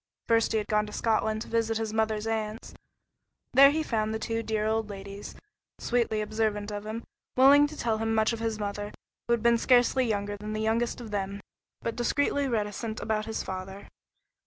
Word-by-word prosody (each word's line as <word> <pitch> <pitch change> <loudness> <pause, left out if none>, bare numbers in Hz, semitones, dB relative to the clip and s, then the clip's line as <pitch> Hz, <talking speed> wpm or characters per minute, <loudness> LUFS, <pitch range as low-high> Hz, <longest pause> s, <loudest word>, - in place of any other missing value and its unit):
First 230 0 +3
he 225 - +2
had 210 - -1
gone 210 0 +1
to - - -8
Scotland 220 -1 0
to - - -13
visit 225 -1 0
his 220 -1 -3
mother's 220 -1 0
aunts. 220 0 -3 0.8
There 275 +2 +9
he 315 +2 0
found 220 -6 -1
the 220 - -1
two 225 +1 -2
dear 220 -1 -1
old 220 0 0
ladies, 200 0 -8 0.4
sweetly 235 -3 0
observant 210 -1 -1
of 205 0 -5
him, 225 +2 -4 0.3
willing 285 +3 +7
to 305 +1 -10
tell 225 -2 0
him 225 0 0
much 220 +1 +3
of 230 - -4
his 225 -1 -2
mother, 205 0 -4 0.4
who 235 - +3
had 235 -1 0
been 235 0 +4
scarcely 250 +1 +4
younger 205 -1 -2
than 210 +1 -6
the 215 - -2
youngest 230 +3 0
of 225 -3 -8
them, 200 -1 -3 0.4
but 230 - -2
discreetly 285 +3 +1
reticent 220 -1 -2
about 215 -1 -1
his 220 - -3
father. 190 +1 -7
220 Hz, 195 wpm, -28 LUFS, 210-230 Hz, 0.8 s, There